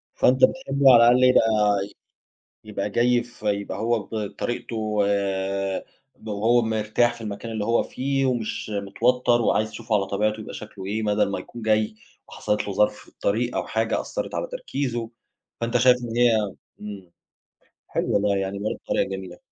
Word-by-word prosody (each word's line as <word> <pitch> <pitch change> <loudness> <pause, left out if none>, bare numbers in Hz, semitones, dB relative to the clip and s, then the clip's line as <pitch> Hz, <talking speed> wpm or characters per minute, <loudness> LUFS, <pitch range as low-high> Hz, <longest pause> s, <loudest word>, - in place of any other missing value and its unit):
فأنت 130 +1 +3
بتحب 140 - +2
على 125 - +10
الأقل 125 +1 +5
إيه 130 - +7
يبقى 110 -3 +3 1.1
يبقى 105 -1 -3
جاي 120 +2 +2
ف 120 -2 -18
يبقى 100 -1 -1
هو 115 +1 +1
بطريقته، 110 +3 -4
و 110 -1 -2 1.3
وهو 110 +4 +2
مرتاح 110 +1 +1
في 115 - -12
المكان 110 +2 -6
اللي 105 -2 -2
هو 115 +1 +2
فيه 135 +1 -1
ومش 120 -4 -2
متوتّر، 120 +5 +1
وعايز 110 -1 +1
تشوفه 115 -2 -2
على 100 - +1
طبيعته، 105 +2 0
يبقى - - -8
شكله 105 -3 -9
إيه، 110 +3 -2
بدل 105 -1 +2
ما - - -2
يكون 120 - -10
جاي 110 -1 +1 0.3
وحصلت 105 0 -2
له 100 - -3
ظرف 105 +1 +3
في - - -16
الطريق 120 +4 -1
أو - - -2
حاجة 110 0 0
أثرت - - -5
على - - -2
تركيزه. 130 - -3 0.5
فأنت 115 +1 +1
شايف 125 +1 +5
إن 115 -1 -4
هي 120 -1 +5 0.5
إمم، 100 -4 -8 0.8
حلو - - -1
والله 100 0 +2
يعني 95 +1 -3
برضه 105 +2 -3
طريقة - - +1
جميلة. 95 -2 -6
110 Hz, 165 wpm, -24 LUFS, 105-120 Hz, 1.3 s, على